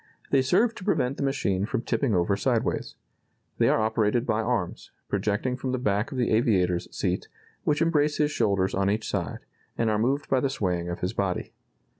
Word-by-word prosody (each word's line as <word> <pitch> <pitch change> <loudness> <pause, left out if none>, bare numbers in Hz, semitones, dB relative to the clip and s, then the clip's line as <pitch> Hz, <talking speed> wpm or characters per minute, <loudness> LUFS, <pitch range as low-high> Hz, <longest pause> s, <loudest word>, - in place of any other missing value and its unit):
They 135 - +5
serve 220 - +3
to 215 - -10
prevent 140 -9 0
the - - -4
machine 135 -9 0
from 115 - -2
tipping 120 -5 0
over 90 +3 +2
sideways. - - -1 0.6
They - - +4
are - - +3
operated 110 +2 +1
by 110 -2 +1
arms, 115 -7 -2 0.2
projecting 105 +5 0
from 130 0 -3
the - - +1
back 105 -2 0
of 135 - -5
the 120 - +1
aviator's 95 -6 +2
seat, - - -2 0.4
which 150 +1 +2
embrace 150 -3 +2
his 150 0 +2
shoulders 100 -6 +1
on 95 0 +1
each 110 +2 -1
side, - - -3 0.4
and 115 -1 +2
are 105 - +1
moved 135 +6 0
by 130 - +2
the 135 - 0
swaying 90 -8 -1
of 85 - -5
his 90 +3 -1
body. 95 -5 -2
110 Hz, 195 wpm, -26 LUFS, 100-135 Hz, 0.6 s, They